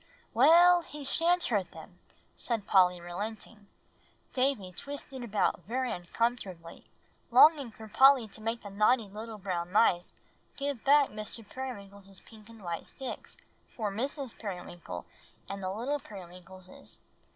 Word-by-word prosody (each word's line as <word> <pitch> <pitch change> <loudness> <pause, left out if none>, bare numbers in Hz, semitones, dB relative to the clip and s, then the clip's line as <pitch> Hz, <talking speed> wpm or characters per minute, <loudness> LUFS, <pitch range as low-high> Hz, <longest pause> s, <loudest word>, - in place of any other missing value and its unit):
"Well, 345 +8 +7
he 300 -3 -9
sha'n't 335 +5 +2
hurt 205 -6 0
them," - - -13 0.4
said 230 -4 -3
Polly, 180 -2 +4
relenting. 205 +4 -7 0.7
Davie 255 -8 0
twisted 275 +4 -7
about 215 -3 0
very 255 +3 -1
uncomfortably, 180 -2 -3 0.4
longing 300 -5 +6
for 220 0 -12
Polly 265 +1 +6
to 215 - -11
make 225 +2 -3
the 205 - -8
naughty 215 +3 +3
little 215 +2 -8
brown 180 -3 -3
mice 180 -4 +3 0.5
give 280 -4 -3
back 285 0 +5
Mr. 215 +1 -6
Periwinkle's 200 -7 -8
pink 215 -1 -16
and 225 -3 -14
white 170 -2 -4
sticks 265 - -7 0.4
for 215 -4 -2
Mrs. 265 +4 -3
Periwinkle 175 - -7 0.4
and 195 0 -6
the 185 - -2
little 250 +9 -2
Periwinkleses. 185 -3 -11
220 Hz, 130 wpm, -30 LUFS, 190-260 Hz, 0.7 s, Well